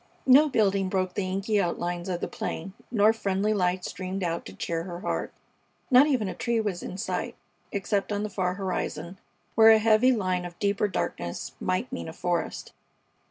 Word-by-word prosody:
No 280 +4 +7
building 200 -6 +2
broke 185 -1 -1
the 185 -1 -2
inky 195 +2 +1
outlines 175 0 -2
of 175 -1 -2
the - - -1
plain, 185 +4 -5 0.2
nor 215 -1 +4
friendly 205 -1 0
light 180 -2 0
streamed 185 +1 -4
out 170 -1 -2
to 95 - -9
cheer 165 - -2
her 175 -1 -7
heart. - - -2 0.6
Not 260 +3 +7
even 255 -8 +1
a - - -3
tree 235 -2 0
was 205 -5 -2
in 185 - -6
sight, 220 - -3 0.4
except 200 +1 -1
on 205 0 -1
the 215 - -3
far 180 -2 -1
horizon, 185 -2 -4 0.3
where 225 0 +7
a 220 - +8
heavy 220 +3 +4
line 185 -6 0
of 175 -1 -8
deeper 200 0 +1
darkness 85 - -3
might 185 +8 -1
mean 255 - -4
a - - -8
forest. 175 0 -2
195 Hz, 185 wpm, -27 LUFS, 180-215 Hz, 0.6 s, a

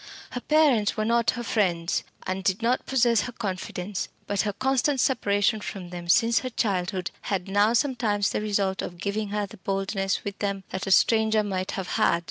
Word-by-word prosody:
Her 245 - -4
parents 275 -10 +3
were 215 - 0
not 235 0 +2
her 240 - -3
friends, 175 -7 0 0.2
and 185 +1 -3
did 190 +4 0
not 245 +2 +1
possess 240 -4 +3
her 245 - -4
confidence; 195 -2 -4 0.2
but 200 -1 0
her 205 -1 -2
constant 265 +3 +1
separation 215 -4 +2
from 185 -4 -6
them 175 -1 -7
since 230 +6 +4
her 255 - -4
childhood 185 -5 -1 0.2
had 190 -2 -1
now 205 +3 +3
sometimes 230 -6 +1
the - - -1
result 200 -2 0
of 175 - -6
giving 200 +3 -2
her 205 0 -1
the 210 +2 -13
boldness 195 0 -1
with 200 -1 -6
them 200 -1 -2
that 190 +1 -4
a - - 0
stranger 220 +1 +4
might 190 -2 -3
have 190 -2 -4
had. 170 - +3
205 Hz, 190 wpm, -26 LUFS, 190-230 Hz, 0.2 s, since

